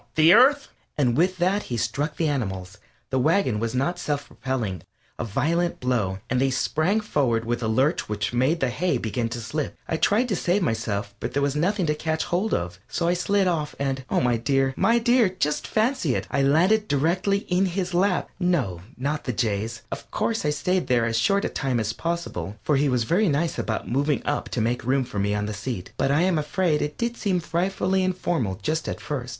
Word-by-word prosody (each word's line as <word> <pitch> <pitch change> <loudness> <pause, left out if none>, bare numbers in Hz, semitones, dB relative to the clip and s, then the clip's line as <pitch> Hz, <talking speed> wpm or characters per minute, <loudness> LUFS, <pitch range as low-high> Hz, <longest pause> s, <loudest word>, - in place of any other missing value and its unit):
The 160 +2 +7
Earth?" 275 +5 +5 0.3
And 125 -5 +2
with 185 +4 +2
that 185 +4 +1
he 120 - -1
struck 130 +7 -2
the 165 - +1
animals 95 -8 -3 0.3
the 130 - +1
wagon 130 - +2
was 115 +2 -2
not 155 +8 0
self 145 -3 -2
propelling 115 -10 -3 0.4
a - - -1
violent 160 - 0
blow, 115 -7 0
and 125 +1 0
they 135 - +3
sprang 160 +10 +1
forward 125 - 0
with 120 +1 -1
a 115 - -1
lurch 130 +8 +1
which 105 +2 -2
made 130 +7 +1
the 130 -2 +1
hay 180 +7 0
begin 115 +1 -2
to 115 - -5
slip. 140 +6 -4
I 160 - -1
tried 220 +9 +2
to 200 - +1
save 180 +3 +1
myself, 110 -6 -2
but 125 - -4
there 140 - +2
was 140 0 0
nothing 185 +5 +1
to 150 - +1
catch 160 +1 -2
hold 190 +5 -1
of, 90 +1 -2
so 170 - -2
off - - +3
I - - +2
slid 195 +2 +1 0.3
and 135 -1 -2
oh, - - +2
my 120 -2 +2
dear, 135 +2 +1
my 230 +1 +3
dear, 235 -2 +4
just 150 -5 -1
fancy 220 - +1
it! - - -2
I 140 - +1
landed 180 +10 +3
directly 180 +8 +1
in 185 +2 +2
his 180 0 -2
lap. 180 +1 +2
No, 140 - 0 0.2
not 145 +4 -2
the 125 - -1
Jay's. 115 0 -2
Of - - -6
course, 225 -7 -1
I - - +2
stayed 180 +5 0
there 120 -2 +3
as 115 -1 -1
short 200 - +2
a - - 0
time 130 -4 -1
as 110 0 -1
possible, 165 - -3
for 150 - +2
he 140 +1 +2
was 125 -2 +1
very 180 - +2
nice 155 +3 0
about 110 - -2
moving 140 +3 0
up 145 - -1
to 120 - -1
make 120 +3 0
room 130 +2 +2
for 110 -5 -5
me 100 +1 +1
on 105 0 -1
the 105 - -4
seat, 100 -2 -5
but - - 0
I 145 +3 +3
am 180 -3 +2
afraid 155 +1 0
it 150 0 -3
did 235 0 -2
seem 190 -4 0
frightfully 185 +3 0
informal 175 - -1
just 155 +1 -1
at - - -4
first. 130 -4 -4
145 Hz, 220 wpm, -24 LUFS, 120-180 Hz, 0.4 s, The